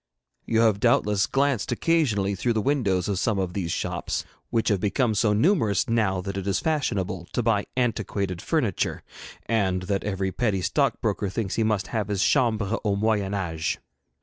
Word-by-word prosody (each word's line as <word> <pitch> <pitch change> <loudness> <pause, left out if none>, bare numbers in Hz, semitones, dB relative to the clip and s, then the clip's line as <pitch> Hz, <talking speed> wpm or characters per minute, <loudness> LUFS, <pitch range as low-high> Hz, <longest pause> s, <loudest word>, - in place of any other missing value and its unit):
You 115 0 +3
have 110 -3 +3
doubtless 105 -3 +2
glanced 135 -6 0
occasionally 115 -13 +1
through 115 +5 0
the 110 - 0
windows 105 -10 +1
of 100 -3 -1
some 105 -1 +1
of 95 -2 -2
these 90 -4 -2
shops, - - -2 0.2
which 115 -1 +1
have 100 -3 +2
become 110 +4 +1
so 105 +1 +2
numerous 115 - +2
now 105 -6 +1
that 100 +1 -5
it 95 0 -4
is 100 - +1
fashionable 95 - -1
to 120 - 0
buy 105 -3 +1
antiquated 100 -6 -1
furniture, - - -1 0.4
and 95 -5 0
that 100 +1 -1
every 95 -2 -2
petty 100 -4 0
stockbroker 100 - 0
thinks 95 0 -3
he 115 - +1
must 110 -3 0
have 110 -4 0
his 100 -3 0
chambre 115 -5 +2
au 105 -2 +1
moyen 105 -1 0
âge. 80 -5 -2
105 Hz, 175 wpm, -25 LUFS, 95-115 Hz, 0.4 s, You